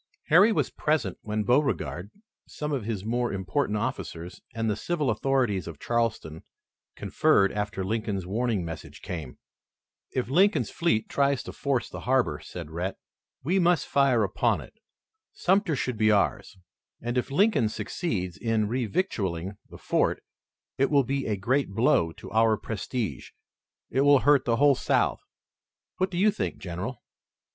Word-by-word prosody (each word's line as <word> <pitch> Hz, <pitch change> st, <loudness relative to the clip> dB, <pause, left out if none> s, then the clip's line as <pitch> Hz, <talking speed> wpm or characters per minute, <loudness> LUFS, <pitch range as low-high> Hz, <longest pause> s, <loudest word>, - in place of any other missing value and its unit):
Harry 195 Hz, +8 st, +7 dB
was -, -, 0 dB
present 140 Hz, -, -1 dB
when 105 Hz, 0 st, -2 dB
Beauregard, 125 Hz, -7 st, 0 dB, 0.4 s
some 150 Hz, 0 st, -5 dB
of 130 Hz, -7 st, -2 dB
his 105 Hz, -3 st, -3 dB
more 120 Hz, +2 st, 0 dB
important 100 Hz, +4 st, -1 dB
officers 105 Hz, -7 st, -5 dB
and 115 Hz, 0 st, -1 dB
the 105 Hz, -, +1 dB
civil 150 Hz, +1 st, -1 dB
authorities 110 Hz, -5 st, 0 dB
of 85 Hz, -3 st, -7 dB
Charleston, 115 Hz, -9 st, -1 dB, 0.5 s
conferred 100 Hz, 0 st, +2 dB
after 105 Hz, -1 st, -3 dB
Lincoln's 105 Hz, -3 st, -2 dB
warning 110 Hz, -1 st, -1 dB
message 80 Hz, -1 st, -8 dB
came. 80 Hz, -8 st, -6 dB, 0.7 s
"If 130 Hz, -, -2 dB
Lincoln's 190 Hz, -, +3 dB
fleet 165 Hz, -11 st, +1 dB
tries 140 Hz, -2 st, +1 dB
to -, -, -7 dB
force 135 Hz, -4 st, -1 dB
the -, -, -8 dB
harbor," 130 Hz, -, +2 dB
said 85 Hz, -4 st, -8 dB
Rhett, 90 Hz, +4 st, -3 dB, 0.5 s
"we 180 Hz, +8 st, +2 dB
must 175 Hz, -2 st, +3 dB
fire 135 Hz, -5 st, +3 dB
upon 95 Hz, -, +1 dB
it. -, -, -12 dB, 0.6 s
Sumter 190 Hz, -3 st, +2 dB
should 125 Hz, -3 st, -2 dB
be 110 Hz, 0 st, +4 dB
ours, 100 Hz, -1 st, +1 dB, 0.4 s
and 120 Hz, +1 st, -3 dB
if 125 Hz, -, 0 dB
Lincoln 150 Hz, -, +3 dB
succeeds 105 Hz, -, -3 dB
in 115 Hz, -2 st, 0 dB
revictualling 105 Hz, -, -2 dB
the -, -, -11 dB
fort -, -, 0 dB, 0.6 s
it 135 Hz, -, +3 dB
will 140 Hz, -2 st, +4 dB
be 135 Hz, +2 st, -2 dB
a 105 Hz, -2 st, 0 dB
great 130 Hz, +7 st, +1 dB
blow 100 Hz, -8 st, +3 dB
to -, -, -11 dB
our 110 Hz, 0 st, +3 dB
prestige. 110 Hz, -, -4 dB, 0.6 s
It 135 Hz, -, +2 dB
will 145 Hz, -1 st, +6 dB
hurt 145 Hz, -1 st, +4 dB
the 115 Hz, -, +2 dB
whole 145 Hz, +3 st, +5 dB
South. -, -, +1 dB, 0.8 s
What 185 Hz, +1 st, +1 dB
do 175 Hz, -, -5 dB
you 210 Hz, +4 st, +4 dB
think, 90 Hz, -, -3 dB
General?" 95 Hz, +7 st, -6 dB
115 Hz, 150 wpm, -27 LUFS, 100-140 Hz, 0.8 s, Harry